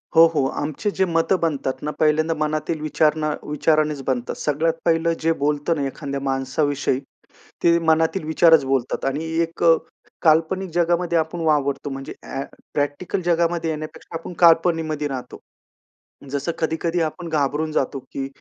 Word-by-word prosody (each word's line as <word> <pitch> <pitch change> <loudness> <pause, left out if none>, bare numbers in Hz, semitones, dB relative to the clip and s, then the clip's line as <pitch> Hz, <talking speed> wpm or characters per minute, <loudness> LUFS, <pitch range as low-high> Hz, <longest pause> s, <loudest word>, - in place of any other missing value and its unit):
हो, 165 - +9
हो. 155 -5 0 0.2
आमचे 155 +8 -2
जे 190 -1 +1
मतं 165 +2 +1
बनतात 145 -5 0
ना 150 - -2
पहिल्यांदा 155 +1 +3
मनातील 155 +1 -2
विचार 155 0 +2
ना 155 - +1
विचारानेच 150 -1 +1
बनतात. 125 -2 -1
सगळ्यात 155 +3 0
पहिलं 165 0 +2
जे 165 +1 +1
बोलतो 150 +2 +1
ना 145 -3 -1
एखाद्या 140 0 -5
माणसाविषयी, 135 0 0 0.6
ते 170 0 +5
मनातील 160 +3 +2
विचारच 160 -1 +5
बोलतात. 135 -2 -1
आणि 140 +4 -1 0.2
एक 165 0 -3
अ, 165 -1 +7 0.5
काल्पनिक 165 +4 +2
जगामध्ये 175 0 +1
आपण 160 +2 -1
वावरतो. 145 -2 +1
म्हणजे 135 0 -6
अ‍ॅ 135 - -4 0.3
प्रॅक्टिकल 145 +6 -1
जगामध्ये 170 -1 +1
येण्यापेक्षा 155 +1 -6
आपण 170 - -8
कल्पनेमध्ये 165 -3 +3
राहतो. 130 -3 -6 0.9
जसं 145 +4 -1
कधी-कधी 165 +2 -1
आपण 165 +2 -3
घाबरून 150 +1 0
जातो, 135 -2 -1
की 135 +1 -6
155 Hz, 145 wpm, -22 LUFS, 145-165 Hz, 0.9 s, हो